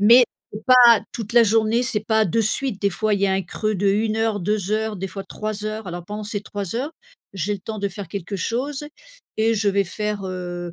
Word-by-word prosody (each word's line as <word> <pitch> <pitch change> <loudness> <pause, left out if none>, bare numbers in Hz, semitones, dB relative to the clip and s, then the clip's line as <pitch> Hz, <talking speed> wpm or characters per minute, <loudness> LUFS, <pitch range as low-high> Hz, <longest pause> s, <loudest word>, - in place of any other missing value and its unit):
mais 235 +5 +8 0.3
c'est 210 - -8
pas 245 -3 +8
toute 225 -3 -5
la 235 0 +7
journée, 225 +2 +3
c'est 245 -4 +1
pas 220 -1 +3
de 210 +4 +1
suite, 220 0 -1
des 200 - +2
fois 215 +4 0
il 200 - +1
y - - +5
a 190 - +1
un 190 0 +1
creux 215 +4 -2
de 200 +1 +1
1 215 +2 +1
heure, 225 -2 +1
2 205 +1 -1
heures, 220 0 0
des 195 +1 -4
fois 195 0 -7
3 215 -1 -5
heures, 215 -1 -4
alors 175 0 -6
pendant 210 +3 -6
ces 205 -1 -4
3 205 0 -5
heures, 285 +6 -3 0.4
j'ai 195 +2 -1
le - - -6
temps 215 +2 -6
de 200 - 0
faire 195 0 -7
quelque 200 +3 -5
chose 270 +9 -2 0.5
et 225 +1 +2
je 210 -1 +1
vais 200 0 +3
faire 210 +2 -3
heu, 175 -2 -5
210 Hz, 240 wpm, -22 LUFS, 195-225 Hz, 0.5 s, mais